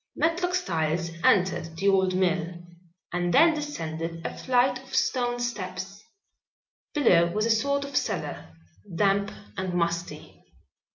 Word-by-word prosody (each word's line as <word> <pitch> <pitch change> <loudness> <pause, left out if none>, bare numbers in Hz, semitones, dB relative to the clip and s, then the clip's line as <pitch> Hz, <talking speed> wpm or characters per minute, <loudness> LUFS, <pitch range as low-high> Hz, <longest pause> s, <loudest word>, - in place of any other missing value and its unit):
Matlock 355 +2 +1
Styles 165 - -1
entered 170 -3 +2
the 195 +4 0
old 190 -1 +3
mill 180 -2 0 0.6
and 175 0 0
then 325 - +6
descended 165 - -5
a - - -4
flight 255 0 +2
of - - -8
stone 245 -2 +1
steps. 195 -4 -5 0.9
Below 175 - +5
was 215 +3 0
a 230 - +2
sort 280 +5 +1
of 280 0 -9
cellar, - - -2 0.5
damp 200 +2 +2 0.3
and 185 -2 -2
musty. 170 0 -3
190 Hz, 125 wpm, -26 LUFS, 170-245 Hz, 0.9 s, then